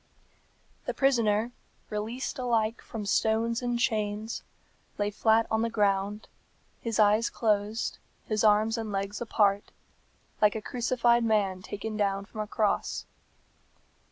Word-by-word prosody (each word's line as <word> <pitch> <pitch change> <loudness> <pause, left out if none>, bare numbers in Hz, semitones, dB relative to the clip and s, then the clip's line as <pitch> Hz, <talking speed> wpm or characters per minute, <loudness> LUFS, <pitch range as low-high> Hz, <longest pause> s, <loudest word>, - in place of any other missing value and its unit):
The - - -3
prisoner, 235 -4 +2 0.4
released 225 +6 -3
alike 230 -2 0
from 215 -3 -6
stones 225 +3 +1
and 245 -1 -1
chains, 215 -2 -1 0.6
lay 205 0 0
flat 220 +2 +3
on 220 0 +2
the 230 - +1
ground, 205 -1 0 0.5
his 230 -2 -3
eyes 215 +2 +4
closed, 215 0 0 0.3
his 215 -1 0
arms 215 +2 +4
and 220 -2 -4
legs 200 +2 -3
apart, 205 -3 +1 0.7
like 210 0 +5
a - - -1
crucified 240 +1 +1
man 200 -4 +1
taken 210 +3 -5
down 200 -1 0
from 215 - -10
a 210 - -4
cross. 215 -2 0
215 Hz, 125 wpm, -28 LUFS, 205-230 Hz, 0.7 s, like